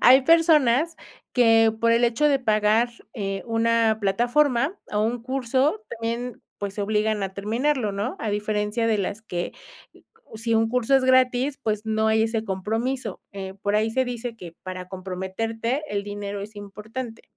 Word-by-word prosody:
hay 260 +2 +7
personas 320 -1 +4 0.4
que 225 -2 +5
por 230 0 +4
el 230 +1 +3
hecho 240 +5 +2
de 280 -2 +3
pagar, 215 0 +2 0.2
eh, 195 -4 -3
una 225 -1 +2
plataforma, 245 - +2 0.2
o 210 - +1
un 230 +2 -1
curso 265 - 0
también, 235 +1 -4 0.2
pues, 200 -1 -4
se 210 - -2
obligan 210 0 0
a 190 -1 -3
terminarlo, 225 +3 0
¿no? 200 +1 -3
A 220 - -2
diferencia 210 +2 -1
de 215 -2 +2
las 200 +3 -3
que, 175 -5 -4 0.8
si 230 +1 0
un 225 0 +3
curso 250 +2 +1
es 265 - +1
gratis, 260 +2 +3
pues, 215 -1 -1
no 220 0 +1
hay 220 0 +3
ese 225 -1 -1
compromiso, 225 +3 -2
eh, 190 -1 -6
por 205 0 0
ahí 215 +1 +1
se 260 +3 +1
dice 240 -1 -5
que, 170 -5 -10
para 185 -1 -6
comprometerte, 195 +7 -3
el 200 -1 -2
dinero 205 0 -5
es 210 +2 -8
importante. 220 +4 -7
225 Hz, 165 wpm, -24 LUFS, 205-245 Hz, 0.8 s, hay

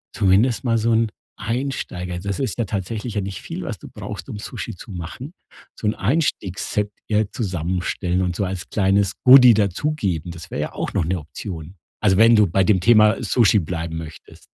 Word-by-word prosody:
zumindest 105 +7 +3
mal 115 -2 +1
so 115 +2 +1
'n 110 -1 +2 0.3
Einsteiger 105 -7 -3
das 100 +1 -3
ist 130 - -2
ja 115 - +1
tatsächlich 105 +4 -4
ja 100 - 0
nicht 95 -1 -5
viel, - - -6
was - - -5
du - - -11
brauchst, - - -7
um 105 - -6
Sushi 110 -3 -6
zu 95 - -11
machen, 95 - -7 0.4
so 105 - -3
'n 105 - +1
Einstiegsset 105 - -1 0.2
eher 105 -1 0
zusammenstellen 90 -2 -2
und 90 -1 -1
so 100 - -1
als 95 -1 -5
kleines 100 0 +2
Goodie 125 -2 +9
dazugeben. 100 - -1
Das 85 -1 -11
wär - - -4
ja - - -3
auch - - -4
noch - - 0
'ne 90 +3 -1
Option. 80 +2 -8 0.3
Also, 95 -3 +3
wenn 115 +1 +7
du 105 -1 +5
bei 95 +3 +2
dem 95 -3 +3
Thema 110 0 +5
Sushi 110 -3 +4
bleiben 80 -1 -4
möchtest. 80 -1 -10
100 Hz, 190 wpm, -21 LUFS, 90-115 Hz, 0.4 s, Goodie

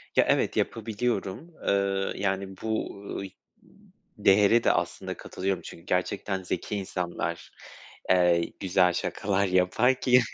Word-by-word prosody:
Ya, - - +5
evet - - +2
yapabiliyorum, 115 - -2
eee, 100 -1 +1
yani, 95 -1 -2
bu 110 -2 -2 0.2
ıy 95 - -6 0.9
değere 105 +4 +5
de - - +5
aslında - - -2
katılıyorum. 95 -1 -3
Çünkü 85 - -10
gerçekten 95 +1 -1
zeki 105 - -3
insanlar, 90 -3 -4 0.6
eee, 90 -2 +3
güzel 90 -2 +3
şakalar 100 +2 0
yapar 95 +8 +3
ki, 125 0 +5
95 Hz, 115 wpm, -27 LUFS, 90-105 Hz, 0.9 s, Ya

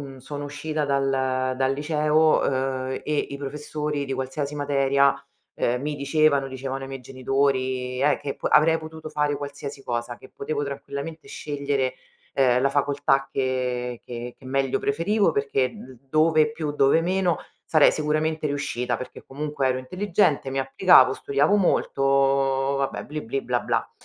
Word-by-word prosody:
io - - -13
sono 145 +2 -6
uscita 150 +1 -3
dal 130 -2 0
dal 135 +1 +1
liceo, 155 +1 +3
uhm, 130 -1 -1
e 150 -1 -1
i 140 - -6
professori 150 +1 -3
di 135 - -3
qualsiasi 135 +3 -3
materia, 140 -1 +3 0.4
ehm, 125 +2 0
mi 150 0 -2
dicevano, 140 0 +2
dicevano 135 0 -5
ai 135 - -7
miei 135 -1 -6
genitori, 130 -1 -1
eh 145 0 +3
che 140 - -4
avrei 160 +2 +4
potuto 160 0 -9
fare 150 -1 0
qualsiasi 140 -1 -7
cosa, 120 0 -3
che 130 - -15
potevo 145 +1 -2
tranquillamente 140 +3 -6
scegliere, 140 -3 -2 0.4
ehm, 125 -2 +3
la 140 - +3
facoltà 140 -1 +1
che 125 -2 -2
che 120 0 -7
che 130 - -17
meglio 135 0 0
preferivo 170 +6 +1
perché 135 -3 0
d 130 -1 -12
dove 155 0 +3
più, 155 -1 -3
dove 145 +3 +3
meno 180 -1 +1 0.3
sarei 155 -2 +6
sicuramente 155 0 0
riuscita 125 -4 -2
perché 130 +2 -9
comunque 145 0 -2
ero 130 0 +1
intelligente, 175 -1 0
mi 135 - -3
applicavo, 135 0 +5
studiavo 145 +8 +1
molto, 175 -6 +1 0.8
vabbè, 135 0 -2
bli, 150 +1 -5
bli, 135 +4 -3
bla, 125 -1 0
bla. - - -1
140 Hz, 150 wpm, -24 LUFS, 130-150 Hz, 0.8 s, sarei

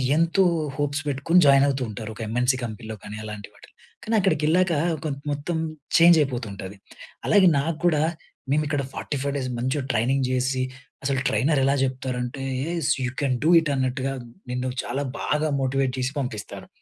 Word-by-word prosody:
ఎంతో 165 +4 +3 0.3
హోప్స్ 145 -1 -1
పెట్టుకొని 145 +5 +3
జాయిన్ 140 0 +6
అవుతూ 135 -2 0
ఉంటారు. 110 +1 -6
ఒక - - -9
ఎంఎన్‌సీ 125 +3 +1
కంపెనీలో 110 -1 -6
కానీ 105 +1 -7
అలాంటి 105 -1 -7
వాటిలో. - - -18 0.3
కానీ 225 - 0
అక్కడికి 180 -6 +1
వెళ్ళాక 175 +3 +3 0.3
కొం 155 -3 -1 0.2
మొత్తం 145 +4 -2 0.4
చేంజ్ 170 0 +7
అయిపోతుంటది. 105 -8 -4 0.5
అలాగే 200 -3 +5
నాగ్గుడా 160 +1 +1 0.5
మేము 150 +2 +3
ఇక్కడ 145 -1 0
45 140 -1 -3
డేస్ 130 -2 -3
మంచిగా 130 +4 -1
ట్రైనింగ్ 130 +4 +1
జేసి, 130 +1 0 0.4
అసలు 135 -1 0
ట్రైనర్ 135 +7 +2
ఎలా 135 +1 +3
జెప్తారంటే, 130 0 -2 0.6
యూ - - -1
కెన్ 135 -3 +1
డూ 160 - +3
ఇట్ 160 -2 -2
అన్నట్టుగా, 130 +1 -1 0.4
నిన్ను 125 +1 -2
చాలా 135 +4 -2 0.2
బాగా 150 +1 0
మోటివేట్ 135 0 0
చేసి 130 +1 -1
పంపిస్తారు. 120 -6 -5
135 Hz, 155 wpm, -24 LUFS, 125-150 Hz, 0.6 s, చేంజ్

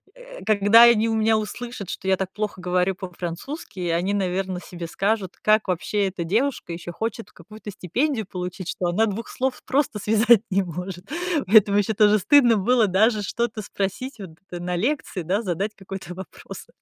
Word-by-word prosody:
э, - - -12
когда 215 +2 +6
они 230 -1 +5
у 225 - 0
меня 220 0 +3
услышат, 215 -2 -6
что - - -6
я 190 - +4
так 190 0 -3
плохо 210 -3 -4
говорю 180 +1 +1
по-французски, 185 - -7
они, 175 +4 0
наверное, 190 -1 -1
себе 175 -2 -8
скажут, 195 +1 -1
как 215 0 +3
вообще 195 +3 0
эта 185 -2 -5
девушка 220 +2 -1
ещё 175 +1 -7
хочет 225 +5 -5
какую-то 210 +4 -11
стипендию 225 - -1
получить, 180 -1 -6
что 180 - -3
она 210 +6 +2
2 215 +3 -5
слов 260 0 -3
просто 275 -5 0
связать 220 +2 +4
не 195 +1 +3
может". 180 +1 -7 0.4
Поэтому 205 0 +6
ещё 210 +2 0
тоже 210 0 +5
стыдно 240 +1 +5
было 235 +3 +3
даже 210 +3 +2
что-то 220 +1 -2
спросить 205 +6 -4
вот 190 -4 -8 0.2
на 175 0 -3
лекции, 220 - -2
да, 190 +6 0
задать 195 +1 -2
какой-то 195 -2 -8
вопрос. 190 +1 -10
200 Hz, 170 wpm, -23 LUFS, 180-225 Hz, 0.4 s, когда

